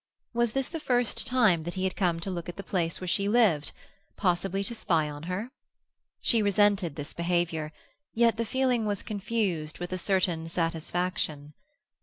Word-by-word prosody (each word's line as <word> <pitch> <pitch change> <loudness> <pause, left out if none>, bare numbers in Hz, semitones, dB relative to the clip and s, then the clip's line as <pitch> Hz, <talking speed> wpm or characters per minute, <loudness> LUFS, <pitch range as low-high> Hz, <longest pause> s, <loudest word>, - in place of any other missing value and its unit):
Was 235 -1 +1
this 270 -1 0
the 330 - -5
first 245 -5 +1
time 225 -10 +4
that 175 +2 -5
he 185 - -2
had 190 - 0
come 175 -4 +1
to 190 - -3
look 175 -1 -4
at 175 - -6
the 195 - -7
place 170 -3 -1
where 185 - -5
she 200 +3 +1
lived—possibly 195 -1 0
to 235 - -2
spy 165 -8 +1
upon 145 -1 -6
her? 210 +7 -3 0.7
She 230 -3 +3
resented 200 -5 +3
this 145 -1 -6
behaviour, 170 -3 0 0.4
yet 230 -1 +3
the 230 - +1
feeling 250 -1 +1
was 205 -2 -2
confused 200 -7 -2
with 175 +1 -5
a 185 - -2
certain 180 -4 +1
satisfaction. 165 -3 -1
185 Hz, 170 wpm, -28 LUFS, 170-215 Hz, 0.7 s, time